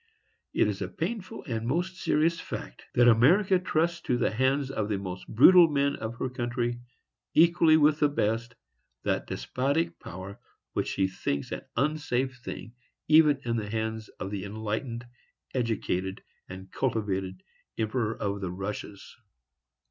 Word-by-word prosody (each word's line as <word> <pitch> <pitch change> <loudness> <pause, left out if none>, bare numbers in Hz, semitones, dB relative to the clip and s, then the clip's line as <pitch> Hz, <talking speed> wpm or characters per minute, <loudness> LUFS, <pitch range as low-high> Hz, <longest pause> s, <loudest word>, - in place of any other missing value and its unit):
It - - +2
is - - -3
a - - -1
painful 210 -6 -5
and 115 -4 -3
most 175 +7 -1
serious 165 -1 +1
fact, - - -7
that 120 0 +6
America 180 - +5
trusts 170 0 0
to 125 - 0
the 125 - +1
hands 130 +4 +1
of 110 -5 -2
the 105 - 0
most 95 -2 -6
brutal 175 +9 +8
men 140 -1 +1
of 110 +1 -5
her 125 - -2
country, 120 -1 -2 0.6
equally 165 -1 +6
with 150 0 +4
the 150 - +4
best, 115 -2 -1 0.5
that - - -1
despotic 160 +6 -1
power 95 +3 -8 0.3
which - - -1
she 95 - +1
thinks 70 -6 -3
an - - -3
unsafe 135 -4 0
thing 115 - -7 0.3
even 150 -2 +6
in 115 -1 0
the 105 -2 -3
hands 110 0 -3
of 95 - -4
the 100 -3 -3
enlightened, 110 +4 -4 0.5
educated 100 -6 -2 0.3
and 95 +1 -9
cultivated 95 -6 -2 0.3
Emperor 110 0 -1
of 100 -1 -2
the 95 - -2
Russias. 100 +2 -6
120 Hz, 150 wpm, -28 LUFS, 105-150 Hz, 0.6 s, brutal